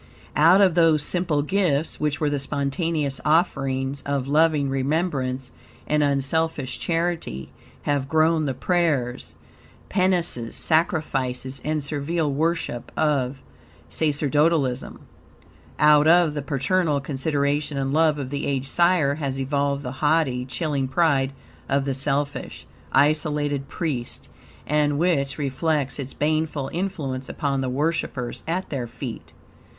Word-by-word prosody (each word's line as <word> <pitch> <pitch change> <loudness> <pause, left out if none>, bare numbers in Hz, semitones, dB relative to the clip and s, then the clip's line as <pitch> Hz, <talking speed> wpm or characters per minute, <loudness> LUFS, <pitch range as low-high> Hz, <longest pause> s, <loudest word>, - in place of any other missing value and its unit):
Out 165 +7 +6
of 190 -3 +5
those 165 -3 +4
simple 165 -5 0
gifts, 165 -4 +1
which 150 -1 -1
were 150 - +1
the 145 - 0
spontaneous 140 +1 -1
offerings 135 -4 +1
of 140 -2 -2
loving 150 -1 +3
remembrance 135 -2 -1 0.3
and 150 0 +1
unselfish 140 0 0
charity, 165 - -2 0.3
have 140 -2 -1
grown 160 0 +3
the 135 - -2
prayers, 140 -6 0 0.5
penances, 180 - 0
sacrifices, 135 -5 0
and 155 -1 -1
servile 150 +1 -1
worship, 160 -5 -2
of 140 -3 0 0.5
sacerdotalism. 150 -3 +1 0.8
Out 150 0 +5
of 170 -2 +5
the 145 - -3
paternal 150 +2 0
consideration 145 +1 -1
and 135 0 -1
love 155 -1 +3
of 135 -2 -5
the 140 0 -2
aged 135 -1 -1
sire 170 -3 +3
has 140 -3 -3
evolved 140 +1 -1
the 125 - -4
haughty, 145 -5 +2
chilling 140 -1 -1
pride 135 -1 +2 0.4
of 140 0 +1
the 135 - 0
selfish, 140 +1 -2 0.3
isolated 145 -2 +1
priest, 140 -9 -4 0.4
and 150 -1 +1
which 145 -5 +1
reflects 145 0 -1
its 135 -1 -6
baneful 155 -2 -1
influence 150 -8 -3
upon 140 -2 -1
the 130 - -1
worshipers 135 -3 -2
at 180 +3 -2
their 130 -4 -3
feet. 115 0 -8
145 Hz, 125 wpm, -24 LUFS, 135-160 Hz, 0.8 s, Out